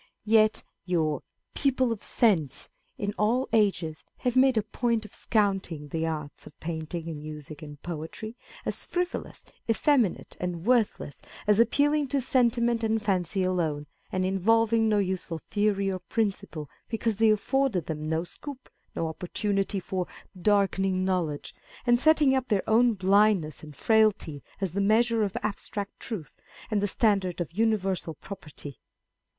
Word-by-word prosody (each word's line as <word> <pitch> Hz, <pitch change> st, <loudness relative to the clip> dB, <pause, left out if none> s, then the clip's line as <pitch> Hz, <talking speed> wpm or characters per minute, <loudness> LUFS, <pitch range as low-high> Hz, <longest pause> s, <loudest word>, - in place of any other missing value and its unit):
Yet 215 Hz, 0 st, +4 dB, 0.2 s
your 155 Hz, -5 st, 0 dB, 0.3 s
people 260 Hz, -3 st, +1 dB
of 225 Hz, -, -4 dB
sense, 165 Hz, -, +1 dB, 0.3 s
in 205 Hz, 0 st, -2 dB
all 240 Hz, +5 st, +2 dB
ages, 185 Hz, -8 st, +1 dB
have 250 Hz, -1 st, -1 dB
made 260 Hz, -2 st, +5 dB
a 215 Hz, -, +3 dB
point 230 Hz, +1 st, -1 dB
of 210 Hz, -, -13 dB
scouting 195 Hz, -8 st, 0 dB
the 165 Hz, +2 st, -1 dB
arts 150 Hz, -2 st, -5 dB
of -, -, -15 dB
painting, 160 Hz, 0 st, -4 dB, 0.2 s
music, 150 Hz, 0 st, -8 dB
and 145 Hz, -2 st, -9 dB
poetry, 175 Hz, +7 st, -6 dB, 0.3 s
as -, -, -2 dB
frivolous, 355 Hz, +1 st, -3 dB, 0.2 s
effeminate, 235 Hz, -, +2 dB
and 180 Hz, -1 st, -3 dB
worthless, 230 Hz, -, +1 dB, 0.2 s
as 210 Hz, 0 st, +4 dB
appealing 285 Hz, +5 st, +3 dB
to 275 Hz, +2 st, 0 dB
sentiment 235 Hz, -2 st, +2 dB
and 220 Hz, -1 st, +1 dB
fancy 190 Hz, -2 st, 0 dB
alone, 165 Hz, -5 st, 0 dB, 0.3 s
and 185 Hz, 0 st, 0 dB
involving 225 Hz, +4 st, +3 dB
no 210 Hz, -, +3 dB
useful 185 Hz, -4 st, -1 dB
theory 205 Hz, -2 st, +1 dB
or 185 Hz, -, -3 dB
principle, 185 Hz, -6 st, -2 dB, 0.2 s
because 225 Hz, -2 st, -1 dB
they 225 Hz, 0 st, +5 dB
afforded 215 Hz, -, +1 dB
them 155 Hz, -1 st, -4 dB
no 160 Hz, +1 st, 0 dB
scope, 270 Hz, +8 st, -10 dB, 0.2 s
no 165 Hz, -, -1 dB
opportunity 195 Hz, +4 st, -1 dB
for 185 Hz, -1 st, -3 dB, 0.3 s
darkening 195 Hz, -1 st, +2 dB
knowledge, 170 Hz, -6 st, -1 dB, 0.3 s
and 240 Hz, -1 st, +4 dB
setting 305 Hz, -1 st, +5 dB
up 260 Hz, -1 st, 0 dB
their 205 Hz, -4 st, 0 dB
own 230 Hz, +1 st, +4 dB
blindness 190 Hz, -4 st, +3 dB
and 150 Hz, -2 st, -11 dB
frailty 215 Hz, -10 st, +2 dB, 0.2 s
as 195 Hz, -3 st, -1 dB
the 200 Hz, +3 st, -1 dB
measure 225 Hz, +3 st, +3 dB
of 200 Hz, -3 st, -1 dB
abstract 205 Hz, -1 st, -4 dB
truth, 200 Hz, -10 st, -6 dB, 0.4 s
and 210 Hz, -2 st, +2 dB
the 205 Hz, -, +1 dB
standard 195 Hz, -5 st, +1 dB
of 170 Hz, -3 st, -3 dB
universal 195 Hz, -6 st, 0 dB
propriety. 150 Hz, -6 st, -10 dB
200 Hz, 145 wpm, -27 LUFS, 170-225 Hz, 0.4 s, made